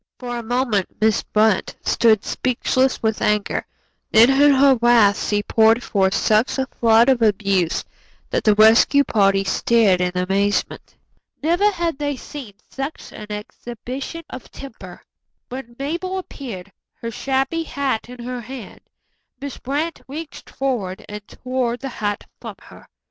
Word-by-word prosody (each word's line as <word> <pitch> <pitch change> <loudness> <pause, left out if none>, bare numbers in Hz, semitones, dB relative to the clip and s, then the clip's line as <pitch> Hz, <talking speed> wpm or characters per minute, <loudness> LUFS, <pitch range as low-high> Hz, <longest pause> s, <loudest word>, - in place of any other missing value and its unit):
For 245 -1 -5
a 240 - -3
moment 235 -4 0
Miss 220 -1 +2
Brant 215 -2 +1
stood 220 -3 +3
speechless 255 +1 0
with 220 -1 0
anger, 210 -1 0 0.4
then 230 +4 +7
in 285 +2 +5
her 275 0 +6
wrath 235 -4 +4
she 205 0 0
poured 225 +2 +3
forth 190 -1 +1
such 215 +5 +2
a 265 - 0
flood 230 -2 +3
of 260 -3 +3
abuse 200 -5 +1 0.5
that - - 0
the 210 -1 +4
rescue 225 +6 +6
party 195 -5 +2
stared 195 -1 +2
in 180 0 0
amazement. 195 +3 -1 0.5
Never 350 +6 +3
had 340 -6 -2
they 290 -1 -1
seen 260 -4 -9
such 275 +3 -6
an 210 - -9
exhibition 240 +8 -7
of 255 - -9
temper. 200 -9 -11 0.5
When 250 -2 -8
Mabel 345 +7 -3
appeared, 225 - -8 0.2
her 230 - -6
shabby 270 +7 -1
hat 275 -7 -3
in 250 -1 -9
her 250 0 -5
hand, 245 -2 -10 0.6
Miss 280 -1 -7
Brant 300 +5 -3
reached 300 +3 -8
forward 230 -9 -3
and 210 0 -9
tore 255 -2 -2
the 270 +2 -6
hat 205 -4 -3 0.2
from - - -7
her. - - -16
235 Hz, 145 wpm, -21 LUFS, 210-270 Hz, 0.6 s, then